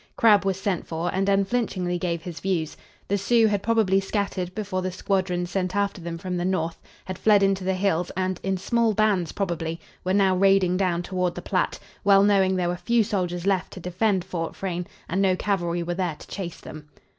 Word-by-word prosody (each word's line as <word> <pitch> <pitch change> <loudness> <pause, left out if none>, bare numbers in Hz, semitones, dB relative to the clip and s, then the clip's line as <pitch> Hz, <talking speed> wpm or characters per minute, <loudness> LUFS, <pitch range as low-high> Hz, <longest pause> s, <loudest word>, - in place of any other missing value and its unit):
Crabb 210 -3 +5
was 190 -1 0
sent 195 -3 -2
for, 165 +2 -2
and 195 +1 +1
unflinchingly 195 -3 0
gave 170 -2 -2
his 170 -2 -7
views. 175 -5 -1 0.3
The 200 +1 0
Sioux 230 +3 +4
had 205 -2 +1
probably 215 -4 +3
scattered 195 -2 -2
before 200 -3 -2
the 185 0 -2
squadrons 180 -2 -1
sent 185 -1 -1
after 200 -2 0
them 170 0 -5
from 180 +1 -4
the 175 - -1
north; 170 -3 -1 0.2
had 185 -1 -6
fled 210 -2 +5
into 195 -1 +2
the 190 0 0
hills 185 -2 0
and, 185 -1 -1
in 190 0 -1
small 230 +3 +1
bands 200 -5 +2
probably, 170 -4 -3 0.2
were 185 +1 +1
now 195 -2 +4
raiding 195 -1 +4
down 180 -2 0
toward 180 -1 -1
the 175 - -6
Platte, 185 - 0 0.3
well 195 0 +6
knowing 195 -2 +3
there 180 -1 0
were 175 - -2
few 235 +4 +2
soldiers 180 -4 -2
left 195 -2 0
to 190 - -8
defend 185 +2 0
Fort 165 -2 -4
Frayne, 180 -2 -3 0.2
and 185 +4 0
no 190 -2 +3
cavalry 175 -3 -1
were 175 +1 -2
there 175 -3 -2
to - - -13
chase 180 -4 -6
them. 150 -1 -10
185 Hz, 205 wpm, -25 LUFS, 175-200 Hz, 0.3 s, well